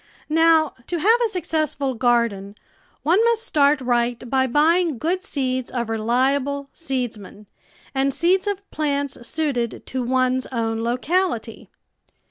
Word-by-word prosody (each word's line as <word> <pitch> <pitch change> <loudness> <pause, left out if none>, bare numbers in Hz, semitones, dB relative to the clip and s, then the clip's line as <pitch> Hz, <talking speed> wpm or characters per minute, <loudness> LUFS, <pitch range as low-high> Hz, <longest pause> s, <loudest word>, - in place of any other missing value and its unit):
Now, 320 0 +4
to 350 - -2
have 440 +9 +4
a 460 - +1
successful 310 -7 -1
garden 230 -5 0 0.5
one 360 +8 +3
must 465 -1 +2
start 295 -8 +3
right 240 -1 0
by 265 -1 +2
buying 315 +3 +2
good 355 +8 -1
seeds 260 -8 -2
of 235 -3 -3
reliable 270 +5 0
seedsmen 240 - -5 0.5
and 270 0 +1
seeds 370 +7 +1
of 400 0 -3
plants 285 -2 -1
suited 275 -8 -2
to 260 - -3
one's 255 +1 +1
own 225 -2 -2
locality. 250 -1 -1
275 Hz, 125 wpm, -22 LUFS, 240-325 Hz, 0.5 s, Now